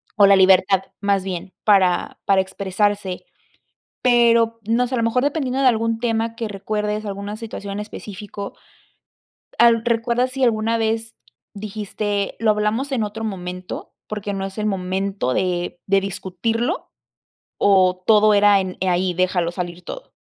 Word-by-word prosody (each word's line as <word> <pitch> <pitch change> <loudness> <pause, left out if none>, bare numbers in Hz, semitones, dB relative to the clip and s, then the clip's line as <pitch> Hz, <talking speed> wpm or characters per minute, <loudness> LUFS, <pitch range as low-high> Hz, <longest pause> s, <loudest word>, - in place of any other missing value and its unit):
O 205 -3 +6
la 200 0 +7
libertad, 190 0 +5 0.2
más 200 -2 +1
bien, 185 -1 -5
para 190 -4 +3
para 195 -1 +4
expresarse, 195 0 -2 0.8
pero 230 -2 +4
no 240 +2 +2
sé, 250 - -5
a - - +1
lo 230 - +1
mejor 230 +2 +1
dependiendo 275 -2 0
de - - +3
algún 230 -1 0
tema 230 -1 -1
que 230 - -3
recuerdes, 210 +1 -3
alguna 200 +1 -5
situación 215 -3 -7
en 205 - -4
específico, 205 -1 -7 1.1
al 230 -1 +5
¿recuerdas 235 +2 +1
si 265 0 -2
alguna 225 -1 +2
vez 225 0 -1 0.4
dijiste 205 -1 -3
lo 225 - +2
hablamos 215 +6 0
en 245 -5 0
otro 210 +2 -5
momento 180 -3 -6
porque 210 -1 -4
no 195 0 -3
es 195 +1 -8
el 215 - -2
momento 190 -5 -1
de 175 -1 -1
de 195 0 +3
discutirlo 225 - -2 0.7
o 185 -2 +3
todo 215 -1 +5
era 205 0 +5
en 185 -1 -4
ahí 180 0 +1
déjalo 180 -1 +1
salir 175 0 -5
todo? - - -9
205 Hz, 150 wpm, -21 LUFS, 190-230 Hz, 1.1 s, la